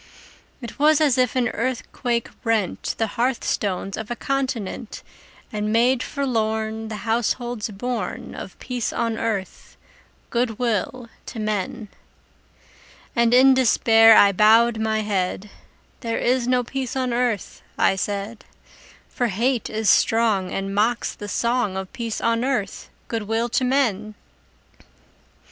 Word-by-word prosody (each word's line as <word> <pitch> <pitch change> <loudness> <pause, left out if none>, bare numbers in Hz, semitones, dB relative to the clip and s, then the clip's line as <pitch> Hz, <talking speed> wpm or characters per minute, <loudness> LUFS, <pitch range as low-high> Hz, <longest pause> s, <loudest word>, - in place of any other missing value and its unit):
It 235 +3 -8
was 305 +1 +5
as 295 -5 +3
if 250 -1 +2
an 245 -2 +2
earthquake 240 0 -2 0.2
rent 220 -5 -1
The 225 - +1
hearth 240 +3 -1
stones 195 -1 -2
of 220 - -6
a 240 - -2
continent, 255 -5 -3 0.5
And 210 0 -2
made 240 +3 +3
forlorn 220 -5 -2
The 220 - -5
households 235 0 -1
born 240 +4 -4
Of - - -9
peace 250 -3 -3
on 230 -1 -2
earth, 215 -4 -4 0.5
good 235 -2 0
will 240 +1 -2 0.2
to 225 - -7
men! 215 0 -3 1.3
And 235 -1 +3
in 260 +2 +7
despair 225 -3 +6
I 200 - +7
bowed 220 +3 +4
my 220 0 0
head; 200 -1 -2 0.5
"There 230 -3 -2
is 250 0 +1
no 250 0 +2
peace 260 +1 -4
on 255 -2 -1
earth," 240 -4 -1 0.2
I - - +3
said: 205 +3 -4 0.6
"For 245 - -1
hate 235 +4 0
is 220 0 -2
strong, 215 -3 +3
And 195 0 -3
mocks 225 +4 +1
the 205 - -8
song 235 -4 0
Of 190 +3 -6
peace 235 -4 -4
on 230 +1 +1
earth, 245 -7 -2 0.2
good 225 -3 -4
will 225 +2 0
to 255 - 0
men!" 225 -6 0
230 Hz, 135 wpm, -22 LUFS, 215-245 Hz, 1.3 s, in